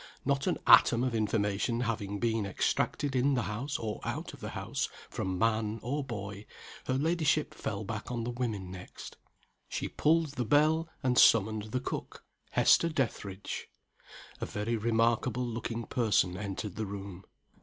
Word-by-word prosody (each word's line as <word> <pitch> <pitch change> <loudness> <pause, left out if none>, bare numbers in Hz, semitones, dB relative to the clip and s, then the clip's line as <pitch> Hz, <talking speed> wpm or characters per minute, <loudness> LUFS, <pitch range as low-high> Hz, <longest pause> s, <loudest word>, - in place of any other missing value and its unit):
Not 140 0 +1
an - - +1
atom 120 +1 +7
of 130 -2 0
information 110 +1 0
having 105 -4 -2
been 115 0 0
extracted 130 +7 0
in 135 +2 +3
the 125 - +1
house 125 +8 -3
or 110 -2 -4
out - - -4
of - - -11
the - - -5
house, - - -2 0.2
from 95 -1 -2
man 110 0 +1
or 140 +5 -1
boy, 105 -4 -6 0.4
her 130 - +1
ladyship 155 0 +1
fell 100 0 -4
back 110 +1 -5
on 120 -2 -2
the 120 - -2
women 110 -7 -3
next. 90 -1 -9 0.5
She - - -2
pulled 160 0 +2
the 125 - +1
bell, 155 +6 +3
and 125 -2 +3
summoned 110 -1 +5
the 110 +4 -2
cook 125 - -5 0.3
Hester 170 - +4
Dethridge. 105 - -3 0.7
A - - -2
very 105 +3 -2
remarkable 115 +2 +1
looking 115 0 -4
person 105 -7 +2
entered 100 0 -5
the 110 -1 -2
room. 95 -2 -7
115 Hz, 155 wpm, -31 LUFS, 105-130 Hz, 0.7 s, atom